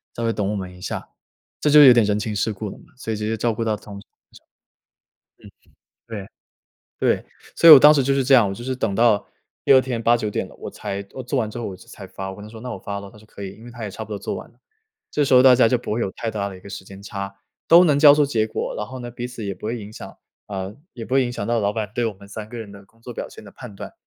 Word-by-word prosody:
稍 115 - -4
微 115 0 +1
等 100 -2 -2
我 - - -2
们 90 -2 -6
一 90 - -15
下。” - - -5 0.5
这 150 - +1
就 150 0 +9
有 130 - +10
点 120 -1 +4
人 105 0 +1
情 105 0 -3
世 105 +3 0
故 105 +1 -6
了 - - -11
嘛， - - -18
所 115 -3 -4
以 - - -2
直 105 - -5
接 110 0 -1
照 115 0 0
顾 115 - -3
到 110 -1 0
同 105 -1 -10
事。 - - -22 2.0
嗯， 105 -4 -7 0.7
对， - - +4
对。 - - -32 0.3
所 170 - +6
以 160 - +14
我 145 - +12
当 150 +2 +9
时 145 -3 +3
就 135 +1 +1
是 135 - +2
这 135 - +2
样， 115 -6 +5
我 95 - -4
就 120 - -9
是 130 +1 -3
等 110 -5 -1
到 110 -2 +3 0.4
第 - - +5
2 130 - +8
天 125 -3 -3
8-9 115 -2 +2
点 - - -2
了， - - -16
我 - - -8
才 100 0 -5
我 130 - -7
做 125 +3 -3
完 110 -3 -1
之 120 - -7
后 120 - -4
我 95 - -6
就 - - -18
才 - - -10
发。 95 0 -7
我 95 - -9
跟 105 - -10
他 - - -10
说： 110 0 -11
“那 125 - -6
我 - - -6
发 100 +1 -5
了。” 100 -1 -10
他 - - -17
说： 105 - -18
“可 100 - -11
以。” 95 - -5
因 115 - -14
为 120 - -10
他 120 -1 -10
也 105 - -5
差 110 +3 -7
不 110 - -18
多 105 - -4
做 - - -4
完 - - -9
了。 - - -32 0.5
这 150 - +1
时 130 - +3
候 125 - +8
大 130 -1 +8
家 125 - +5
就 125 - +2
不 115 - -5
会 115 - -1
有 95 - -1
太 115 - -4
大 100 -2 -3
的 95 - -9
一 90 - -14
个 100 - -12
时 95 -1 -8
间 95 +1 -12
差， 100 -1 -6 0.3
都 170 +2 +8
能 145 -4 +3
交 145 -1 +8
出 150 0 +3
结 110 -6 0
果。 - - -4
然 105 - -4
后 130 0 -8
呢， 120 0 -7
彼 120 +1 -5
此 125 -3 -8
也 100 - -3
不 105 - -9
会 120 +2 -2
影 105 0 -10
响 - - -10 0.3
呃， 95 +1 -6 0.2
也 115 - -8
不 130 - -3
会 135 -1 +4
影 120 - -4
响 100 - -4
到 115 +1 0
老 100 0 0
板 110 -1 -3
对 120 - 0
我 110 - -2
们 100 +1 -16
3 105 +1 -8
个 120 - -9
人 105 -3 -8
的 100 0 -13
工 115 +3 -30
作 120 - -8
表 - - -6
现 - - -13
的 100 - -12
判 120 -1 -11
断、 - - -9
110 Hz, 335 characters per minute, -22 LUFS, 100-125 Hz, 2.0 s, 以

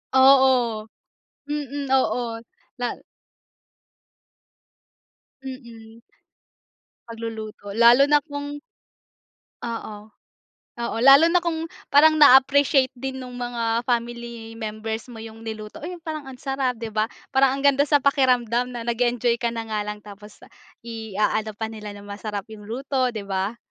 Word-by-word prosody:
Oo, 260 -4 +5 0.6
mm, 285 -1 -4
oo. 240 -3 +1 0.4
La 245 - 0 2.6
Mm. 235 -4 -11 1.1
Pagluluto. 220 -3 -7
Lalo 235 +3 +7
na 295 0 +5
kung 290 -1 -6 1.0
Oo, 220 -2 -6 0.7
oo. 235 - -3
Lalo 275 +5 +8
na 360 - +4
kung 325 -2 -2 0.3
parang 310 +2 +6
na-appreciate 270 -1 +6
din 265 +1 -5
nung 250 0 -9
mga 235 -1 -1
family 235 -1 -3
members 220 +1 -5
mo 245 - -11
yung 225 0 -10
niluto, 215 -1 -7
"Oh, 305 - -6
yung 355 -2 -8
parang 310 -4 -5
ang 265 - -8
sarap," 270 -1 -2
'di 225 -1 -6
ba. 215 0 +1 0.3
Parang 265 0 +4
ang 275 - -5
ganda 280 0 +4
sa 290 -3 +3
pakiramdam 250 -3 +2
na 235 - -5
nag-enjoy 240 0 +1
ka 235 - 0
na 230 -1 -4
nga 215 -1 -3
lang 210 0 -6
tapos 205 0 -13 0.4
i-aano 220 -1 -2
pa 220 - -2
nila 210 -2 -8
na 200 - -11
masarap 205 0 -5
yung 210 -1 -11
luto, 260 +2 -1
'di 210 - -4
ba? 195 +3 -2
235 Hz, 130 wpm, -23 LUFS, 220-270 Hz, 2.6 s, Lalo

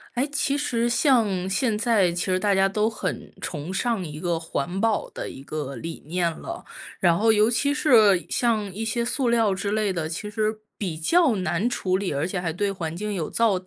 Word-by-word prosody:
哎， 255 +3 +2
其 285 -1 +1
实 240 -5 0
像 225 - +2
现 210 +3 +1
在 210 -6 +3
其 175 +1 -2
实 185 -1 +1
大 200 +1 +2
家 195 0 +4
都 210 +2 +1
很 205 -5 -5
崇 155 +2 -5
尚 230 -1 0
一 150 -2 -7
个 170 -1 -1
环 165 +3 -3
保 225 -2 +1
的 - - -5
一 135 - -10
个 140 -2 -5
理 165 0 -7
念 175 +1 +1
了。 340 - -8 0.3
然 170 -2 +4
后 225 +3 +4
尤 215 +1 +4
其 280 +4 +1
是 215 - +5
像 215 -5 0
一 215 +4 -4
些 235 +2 -1
塑 245 +1 0
料 225 -4 +3
之 195 +2 -3
类 210 -2 +1
的， 160 -3 -2
其 195 +6 -4
实 215 +1 -1 0.2
比 180 -6 -3
较 295 - +3
难 185 +4 0
处 185 -6 -1
理， 195 -1 -2
而 140 +2 -1
且 180 -1 -3
还 170 -2 -1
对 200 +5 -1
环 170 -5 -4
境 210 +3 -3
有 170 -6 -3
造 230 -3 +2
200 Hz, 230 characters per minute, -24 LUFS, 175-230 Hz, 0.3 s, 是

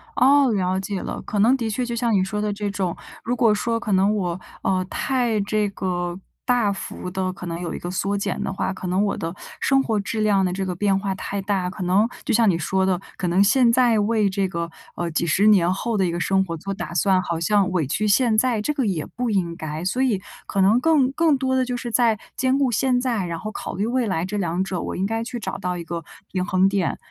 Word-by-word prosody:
哦， 270 0 +5
了 185 -2 0
解 195 0 -3
了。 - - -5
可 205 - -3
能 235 +6 +5
的 230 -3 -2
确 245 +4 -1
就 235 -1 -3
像 235 -1 +1
你 190 -2 +3
说 210 +2 -3
的 210 0 0
这 205 0 -3
种， 190 -3 -2 0.3
如 240 +2 -1
果 230 -4 +4
说 230 +2 -1
可 225 -2 -4
能 195 +2 +3
我 180 -3 -2 0.2
呃， 185 -1 +1
太 245 -5 0
这 210 0 0
个， 175 -2 -3 0.3
大 240 -5 +2
幅 195 -2 -6
地 185 0 -1
可 180 - -9
能 170 0 -4
有 175 - -4
一 - - -5
个 175 - -5
缩 200 +2 -1
减 200 - -2
的 - - -2
话， 190 - -2
可 185 - -6
能 185 +3 +1
我 200 - -1
的 165 +2 -4 0.2
生 270 0 +3
活 220 -4 0
质 215 +2 -2
量 205 -2 +3
的 180 - 0
这 190 0 -2
个 180 - -3
变 195 +1 +2
化 195 0 -2
太 200 +1 -4
大， 190 -2 -1
可 185 - -6
能 190 +5 +3 0.2
就 - - 0
像 225 -1 +4
你 170 - +2
说 190 +3 0
的， 185 -2 +1 0.2
可 180 - -2
能 180 +3 +4
现 240 +3 +4
在 235 -2 +4
为 210 -1 +2
这 190 0 0
个， 170 -2 -4 0.2
呃， 175 -1 -2
几 160 - 0
10 195 +6 +3
年 180 -5 +5
后 215 +4 -1
的 190 - +2
一 175 - 0
个 175 - -3
生 190 +2 +2
活 170 -3 -4
做 195 +4 -4
打 190 - -6
算， 185 +2 +3
好 170 -2 -3
像 195 +2 +2
委 175 -5 +1
屈 210 +10 -1
现 225 +1 +3
在， 235 -1 +2
这 300 +8 -1
个 270 -4 0
也 170 -6 -1
不 245 -1 -3
应 180 -5 0
该。 155 0 -5
所 220 +8 0
以， 225 -8 +1 0.3
可 195 - 0
能 210 +6 +5
更 290 -4 +3
更 315 0 +3
多 260 0 0
的 260 -1 +2
就 250 0 -3
是 240 -1 -5
在 230 -2 +3 0.2
兼 260 +1 +2
顾 270 -3 +2
现 250 +2 +2
在， 235 -7 0
然 170 -1 -4
后 215 +4 -5
考 - - -6
虑 200 +4 -1
未 245 -1 0
来 175 -3 -1
这 200 +3 -3
两 180 -1 0
者 190 -2 -3
我 - - -4
应 190 - -1
该 225 +2 -1
去 245 +1 -5
找 - - -4
到 180 0 -3
一 170 - -5
个 170 0 -5 0.3
平 185 -1 -1
衡 185 -1 +3
点， 195 -3 0
200 Hz, 275 characters per minute, -23 LUFS, 185-230 Hz, 0.3 s, 哦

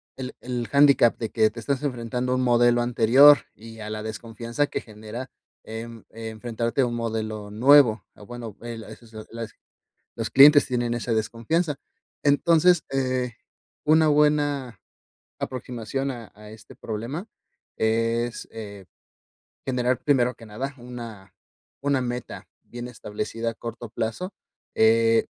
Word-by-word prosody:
el 130 -1 -6
el 120 -2 -3
handicap 140 -4 +5
de 115 - -3
que 110 -1 +3
te 115 +2 -9
estás 135 +3 -1
enfrentando 125 -2 -2
a - - +2
un 130 - 0
modelo 120 -1 +4
anterior 125 +5 +7 0.2
y 115 +1 -12
a 105 0 -6
la 105 0 -5
desconfianza 115 +5 -3
que - - -4
genera, 110 +4 -8 0.3
em, 115 +1 -8
enfrentarte 115 +2 -3
a - - +4
un 120 -1 -3
modelo 110 -2 -4
nuevo. 120 -1 +5
O 105 - -14
bueno, 120 -2 -8
el, 115 -1 -7
eso 120 - -12
es 115 - -19
la 110 0 -8
las 115 -1 -6 0.6
los - - -4
clientes 145 +2 +8
tienen 120 -1 -1
esa 120 0 -2
desconfianza. 115 +9 0 0.5
Entonces 165 +4 +4
eh, 130 -2 -1 0.5
una 160 +1 +5
buena 145 -6 +1 0.6
aproximación 130 +1 -4
a 120 -4 -9
a 105 0 -13
este 110 +1 -14
problema 120 - -5 0.5
es, 115 +1 0
eh, 100 -3 -9 0.8
generar, 125 -1 0
primero 125 -4 +3
que 115 - -14
nada, 125 +6 -5
una 115 -6 -9 0.5
una 140 -2 +1
meta 125 -1 -5 0.2
bien 120 0 -8
establecida 115 -1 -5
a - - -10
corto 115 +1 -7
plazo, 115 - -4 0.4
eh. 115 0 +4
120 Hz, 140 wpm, -25 LUFS, 110-130 Hz, 0.8 s, clientes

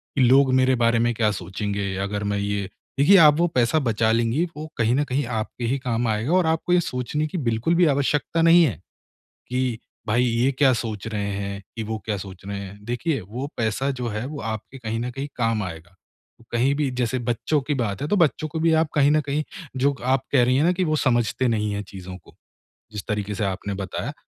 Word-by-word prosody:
कि 140 - +2
लोग 130 +2 +5
मेरे 130 0 +4
बारे 115 -1 +2
में 120 +1 +2
क्या 110 -1 +2
सोचेंगे 100 +1 -3
अगर 105 0 -3
मैं 100 - 0
ये 100 -1 -2 0.3
देखिए 195 +8 +7
आप 150 0 +6
वो 175 - +4
पैसा 125 +6 +3
बचा 110 -4 +1
लेंगी 115 +8 +1
वो 155 +1 -5
कहीं 115 +1 +2
न 145 - +2
कहीं 135 +3 0 0.2
आपके 120 +2 -7
ही 130 +4 +1
काम 120 -2 -1
आएगा 110 +8 0
और 185 -1 +4
आपको 160 +2 +1
ये 180 - +5
सोचने 150 +3 -2
की 175 - -5
बिल्कुल 115 +9 +1
भी 175 +1 +5
आवश्यकता 145 +3 +1
नहीं 165 +1 +7
है, 130 - +1 0.7
कि 125 -2 -1 0.3
भाई 120 +3 +2
ये 120 +2 +2
क्या 135 0 +4
सोच 110 -3 -4
रहे 100 -2 -2
हैं 100 0 -4
कि 115 - -3
वो 110 +1 -3
क्या 105 -2 -1
सोच 95 -1 -9
रहे 100 0 -4
हैं। 100 0 -8
देखिए 130 +5 -1
वो 120 +9 -6
पैसा 115 +4 0
जो 120 - -2
है 105 +3 -3
वो 145 +1 -6
आपके 110 +4 -6
कहीं 115 -2 -3
न 120 +1 -2
कहीं 135 +3 -5
काम 115 -3 0
आएगा, 85 0 -8 0.6
कहीं 125 +4 +2
भी 145 -1 0
जैसे 125 +1 0
बच्चों 120 +5 0
की 145 +2 -2
बात 105 -7 -2
है 145 - -1
तो 205 - +1
बच्चों 155 -2 +2
को 160 +2 -4
भी 165 0 +3
आप 160 - -1
कहीं 145 0 +5
न 155 0 +3
कहीं 145 +1 -2 0.3
जो 140 +2 +2
आप 130 +1 +1
कह 130 -3 +5
रही 125 +1 +3
है 145 - +3
ना 175 - +4
कि 185 +1 0
वो 155 -2 +1
समझते 125 -2 +1
नहीं 105 -2 0
है 100 0 -3
चीज़ों 95 -2 -9
को, - - -20 0.6
जिस 105 -2 -6
तरीके 105 -1 -2
से 105 - -2
आपने 100 +1 -3
बताया, 95 -2 -4
120 Hz, 225 wpm, -23 LUFS, 105-140 Hz, 0.7 s, देखिए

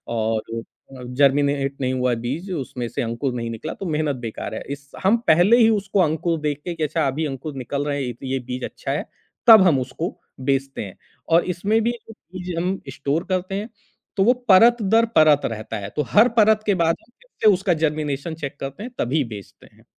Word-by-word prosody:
और 110 -1 0 0.2
अ, 130 +2 -14 0.2
जर्मिनेट 140 0 +2
नहीं 130 0 0
हुआ 125 0 0
है - - +1
बीज। 155 +11 -4
उसमें 130 -7 -4
से - - -3
अंकुर 120 +3 -2
नहीं 115 -1 -3
निकला 115 +8 -5
तो 195 - -8
मेहनत 155 -3 -1
बेकार 110 -1 -5
है। - - -5
इस 140 0 -8
हम 200 +5 +4
पहले 180 +9 +6
ही 225 -2 +6
उसको 205 -2 0
अंकुर 165 0 0
देख 150 -1 -2
के 175 - -3
कि 160 - -3
अच्छा, 155 -1 0
अभी 150 +4 -1
अंकुर 140 +1 -5
निकल 140 +3 -3
रहे 145 -1 -1
हैं 140 - -2
ये 120 - -4
तो 120 - -12
ये 135 0 -1
बीज 125 0 -6
अच्छा - - -6
है। - - -2 0.4
तब 220 -3 +10
हम 145 -6 +4
उसको 125 - -4 0.2
बेचते 135 -1 -1
हैं 95 - -11 0.3
और 165 +1 +4
इसमें 210 +5 +1
भी 235 - +2
जो 230 -2 -11
चीज़ 180 -4 -8
हम 185 +2 -1
स्टोर 145 +5 -1
करते 185 +1 -1
हैं, 210 +4 -4 0.5
तो 195 - +4
वो 245 +4 +5 0.2
परत 230 +5 +7
दर 225 +3 +3
परत 155 -2 +6
रहता 110 -1 -4
है। 100 0 -6
तो 150 - +1
हर 225 - +6
परत 215 0 +5
के 205 - +2
बाद 165 -2 +2
हम 240 - -30
फिरसे 220 - +2
उसका 185 -1 +1
जर्मिनेशन 150 +1 -2
चेक 140 -3 -6
करते 135 +9 -6
हैं 250 - -7
तभी 140 +4 +1
बेचते 105 -5 -11
हैं। - - -24
150 Hz, 220 wpm, -22 LUFS, 135-190 Hz, 0.5 s, तब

